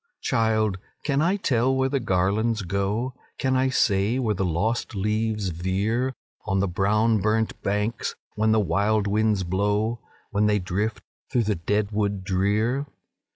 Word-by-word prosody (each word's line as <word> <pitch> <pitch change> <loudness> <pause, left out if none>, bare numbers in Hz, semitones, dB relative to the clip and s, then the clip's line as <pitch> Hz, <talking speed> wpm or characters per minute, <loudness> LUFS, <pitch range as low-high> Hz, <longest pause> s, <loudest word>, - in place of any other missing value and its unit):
"Child! 110 -5 +1 0.2
can 140 -1 +1
I 175 +5 +2
tell 130 - +1
where 130 0 +2
the 135 +1 0
garlands 105 +2 +1
go? 100 +7 -1 0.2
Can 130 -1 +1
I 130 +1 +2
say 105 -2 +2
where 115 -5 +1
the 95 - -2
lost 105 +7 -1
leaves 105 0 0
veer 100 +9 -1 0.3
On 95 0 +1
the 100 - +1
brown 105 +5 +2
burnt 110 +1 0
banks, 105 +3 -1 0.2
when 110 +1 +2
the 110 - +4
wild 100 +3 +1
winds 105 -1 +1
blow, 105 +5 0 0.3
When 105 +1 +2
they 105 0 +3
drift 100 +4 -2 0.3
through 125 -4 +2
the 105 0 +1
dead 105 +5 -1
wood 100 -2 -1
drear? 105 +8 0
105 Hz, 155 wpm, -25 LUFS, 100-115 Hz, 0.3 s, the